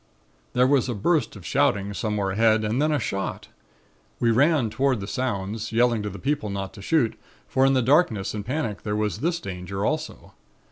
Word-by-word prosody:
"There 125 Hz, 0 st, +4 dB
was 130 Hz, -1 st, +2 dB
a 120 Hz, -, -2 dB
burst 120 Hz, -, +1 dB
of 95 Hz, -4 st, -11 dB
shouting 100 Hz, +6 st, +1 dB
somewhere 105 Hz, -2 st, -1 dB
ahead 110 Hz, +2 st, +3 dB
and 110 Hz, +5 st, 0 dB
then 155 Hz, +1 st, +2 dB
a 150 Hz, -, +2 dB
shot. 100 Hz, -5 st, -4 dB, 0.7 s
We 115 Hz, -, +3 dB
ran 135 Hz, -1 st, +3 dB
toward 135 Hz, -2 st, +1 dB
the 95 Hz, -, -5 dB
sounds, 105 Hz, -1 st, -3 dB
yelling 115 Hz, -1 st, +2 dB
to 105 Hz, -, -3 dB
the 100 Hz, -, -8 dB
people 140 Hz, -5 st, -1 dB
not 100 Hz, -1 st, -4 dB
to 100 Hz, -, -11 dB
shoot; 120 Hz, 0 st, +2 dB, 0.3 s
for 135 Hz, +1 st, +3 dB
in 135 Hz, -, +3 dB
the 130 Hz, -2 st, +2 dB
darkness 120 Hz, -, +2 dB
and 105 Hz, -1 st, -4 dB
panic 115 Hz, -4 st, -3 dB
there 105 Hz, -1 st, -2 dB
was 105 Hz, -1 st, -1 dB
this 170 Hz, +5 st, 0 dB
danger 95 Hz, -, -4 dB
also. 155 Hz, +3 st, -3 dB
110 Hz, 195 wpm, -25 LUFS, 100-135 Hz, 0.7 s, There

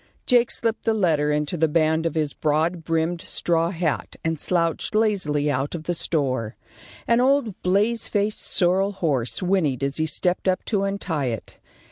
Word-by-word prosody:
Jake 245 Hz, -2 st, +4 dB
slipped 225 Hz, 0 st, -2 dB
the 225 Hz, -, +2 dB
letter 155 Hz, -7 st, +2 dB
into 150 Hz, +3 st, -1 dB
the 160 Hz, 0 st, +3 dB
band 160 Hz, +1 st, +2 dB
of 165 Hz, -, -5 dB
his 150 Hz, -3 st, -1 dB
broad 160 Hz, +3 st, 0 dB
brimmed 165 Hz, +2 st, -1 dB
straw 165 Hz, -1 st, 0 dB
hat 165 Hz, -4 st, -2 dB
and 160 Hz, -1 st, -1 dB
slouched 170 Hz, +4 st, 0 dB
lazily 170 Hz, -10 st, +1 dB
out 135 Hz, +4 st, -2 dB
of 160 Hz, -, -6 dB
the 175 Hz, -, -1 dB
store. 130 Hz, -9 st, -1 dB, 0.5 s
An 235 Hz, +1 st, +4 dB
old 255 Hz, -6 st, +1 dB
blaze 210 Hz, +5 st, +1 dB
faced 210 Hz, 0 st, -1 dB
sorrel 190 Hz, +3 st, +1 dB
horse 150 Hz, -5 st, -1 dB
whinnied 160 Hz, -9 st, +1 dB
as 140 Hz, 0 st, -1 dB
he 160 Hz, 0 st, 0 dB
stepped 180 Hz, +4 st, 0 dB
up 185 Hz, 0 st, +1 dB
to 200 Hz, -3 st, 0 dB
untie 190 Hz, -7 st, -2 dB
it. 115 Hz, -3 st, -5 dB
165 Hz, 170 wpm, -23 LUFS, 150-195 Hz, 0.5 s, Jake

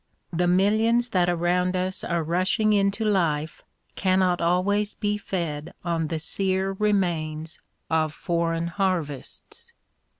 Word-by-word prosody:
The 175 Hz, +1 st, +1 dB
millions 220 Hz, +6 st, +3 dB
that 180 Hz, -4 st, +2 dB
around 175 Hz, +1 st, +1 dB
us 185 Hz, 0 st, -1 dB
are 170 Hz, -1 st, -1 dB
rushing 185 Hz, +6 st, +1 dB
into 200 Hz, +2 st, +1 dB
life 165 Hz, -7 st, 0 dB, 0.3 s
cannot 185 Hz, -2 st, +2 dB
always 200 Hz, +5 st, +1 dB
be 210 Hz, -1 st, -1 dB
fed 170 Hz, -3 st, -4 dB
on 165 Hz, -2 st, 0 dB
the 160 Hz, -, -2 dB
sere 190 Hz, +4 st, -1 dB
remains 170 Hz, -6 st, -1 dB, 0.3 s
of 160 Hz, -1 st, +1 dB
foreign 170 Hz, 0 st, -1 dB
harvests. 170 Hz, -6 st, -3 dB
180 Hz, 120 wpm, -25 LUFS, 165-195 Hz, 0.3 s, millions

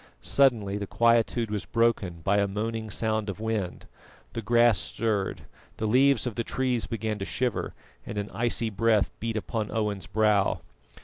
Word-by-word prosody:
Suddenly 110 Hz, -8 st, +2 dB
the 100 Hz, -, -4 dB
quietude 115 Hz, 0 st, +2 dB
was 105 Hz, -2 st, -3 dB
broken 110 Hz, -7 st, +1 dB
by 100 Hz, +1 st, +2 dB
a 100 Hz, 0 st, +2 dB
moaning 110 Hz, +2 st, -3 dB
sound 110 Hz, 0 st, -1 dB
of 100 Hz, -, -5 dB
wind; 110 Hz, -5 st, -3 dB, 0.5 s
the 115 Hz, -, -3 dB
grass 120 Hz, -3 st, +4 dB
stirred, 105 Hz, -2 st, -2 dB, 0.3 s
the 110 Hz, -, -2 dB
leaves 130 Hz, +3 st, +4 dB
of 125 Hz, -, -2 dB
the 115 Hz, -, -2 dB
trees 125 Hz, -1 st, -1 dB
began 110 Hz, -2 st, -3 dB
to -, -, -3 dB
shiver, 125 Hz, 0 st, -2 dB, 0.3 s
and 105 Hz, -, -7 dB
an 100 Hz, +1 st, -3 dB
icy 115 Hz, +1 st, 0 dB
breath 110 Hz, 0 st, +2 dB
beat 115 Hz, 0 st, -2 dB
upon 110 Hz, 0 st, -3 dB
Owen's 105 Hz, -6 st, -2 dB
brow. 105 Hz, -2 st, +2 dB
110 Hz, 165 wpm, -27 LUFS, 100-115 Hz, 0.5 s, grass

